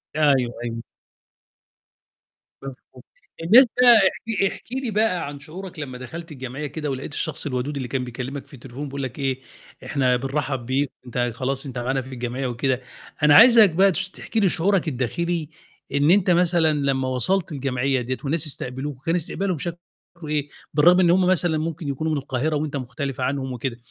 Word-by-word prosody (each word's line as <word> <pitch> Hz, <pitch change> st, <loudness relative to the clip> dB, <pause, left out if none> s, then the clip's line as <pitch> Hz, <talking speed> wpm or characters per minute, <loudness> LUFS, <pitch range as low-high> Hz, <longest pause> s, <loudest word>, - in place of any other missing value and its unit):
أيوه، 150 Hz, -2 st, +4 dB, 0.3 s
أيوه. 115 Hz, -1 st, -4 dB, 1.8 s
مضبوط. 130 Hz, -1 st, -11 dB, 0.4 s
بالنسبة 230 Hz, +10 st, +7 dB, 0.2 s
احكِ 215 Hz, -2 st, +4 dB
احكِ -, -, -13 dB
لي 260 Hz, -2 st, -2 dB
بقى 205 Hz, -6 st, +1 dB
عن 145 Hz, 0 st, -8 dB
شعورك 175 Hz, +4 st, -9 dB
لمّا 130 Hz, -4 st, -6 dB
دخلت 165 Hz, +7 st, -8 dB
الجمعية 135 Hz, +1 st, -6 dB
كده، 150 Hz, +1 st, -4 dB
ولقيت 135 Hz, +2 st, -5 dB
الشخص 155 Hz, 0 st, 0 dB
الودود 135 Hz, +1 st, -2 dB
اللي 130 Hz, -2 st, -4 dB
كان 130 Hz, +1 st, -2 dB
بيكلّمك 130 Hz, +3 st, -6 dB
في -, -, -21 dB
التليفون 135 Hz, +2 st, -8 dB
بيقول 140 Hz, 0 st, -5 dB
لك 130 Hz, +1 st, -6 dB
إيه: 135 Hz, -1 st, -1 dB, 0.4 s
"إحنا 130 Hz, -3 st, +1 dB
بنرحب 135 Hz, 0 st, -2 dB
بك، 135 Hz, +2 st, 0 dB
أنت 120 Hz, 0 st, -1 dB
خلاص 135 Hz, +3 st, -2 dB
أنت 130 Hz, -2 st, -7 dB
معانا 130 Hz, +2 st, -1 dB
في 130 Hz, -, -12 dB
الجمعية" 125 Hz, +2 st, -3 dB
وكده، 125 Hz, +1 st, -1 dB, 0.4 s
أنا 150 Hz, -1 st, +7 dB
عايزك 230 Hz, +1 st, +8 dB
بقى 190 Hz, +4 st, +4 dB
تش 190 Hz, +2 st, -3 dB
تحكِ 225 Hz, -, -7 dB
لي 200 Hz, -4 st, +4 dB
شعورك 185 Hz, +1 st, +1 dB
الداخلي 155 Hz, +4 st, -2 dB, 0.4 s
إن 145 Hz, +3 st, +3 dB
أنت 195 Hz, -1 st, +4 dB
مثلًا 170 Hz, -2 st, +3 dB
لمّا 135 Hz, -3 st, 0 dB
وصلت 165 Hz, +9 st, +1 dB
الجمعية 135 Hz, -2 st, -1 dB
ديّة 130 Hz, +2 st, -3 dB
وناس 155 Hz, +2 st, +1 dB
استقبلوك، 130 Hz, 0 st, -5 dB
كان 165 Hz, -, +1 dB
استقبالهم 180 Hz, +2 st, -2 dB
شكله 170 Hz, +3 st, -5 dB, 0.5 s
إيه؟ 150 Hz, -1 st, -1 dB, 0.2 s
بالرغم 175 Hz, +5 st, +5 dB
إن 180 Hz, -2 st, +4 dB
هُم 185 Hz, +1 st, +3 dB
مثلًا 175 Hz, -3 st, +2 dB
ممكن 160 Hz, 0 st, -4 dB
يكونوا 150 Hz, +3 st, -2 dB
من 155 Hz, -, 0 dB
القاهرة 140 Hz, +2 st, -2 dB
وأنت 145 Hz, 0 st, -2 dB
مختلف 135 Hz, +1 st, -5 dB
عنهم 130 Hz, 0 st, -2 dB
وكده، 125 Hz, 0 st, -4 dB
145 Hz, 170 wpm, -23 LUFS, 130-170 Hz, 1.8 s, عايزك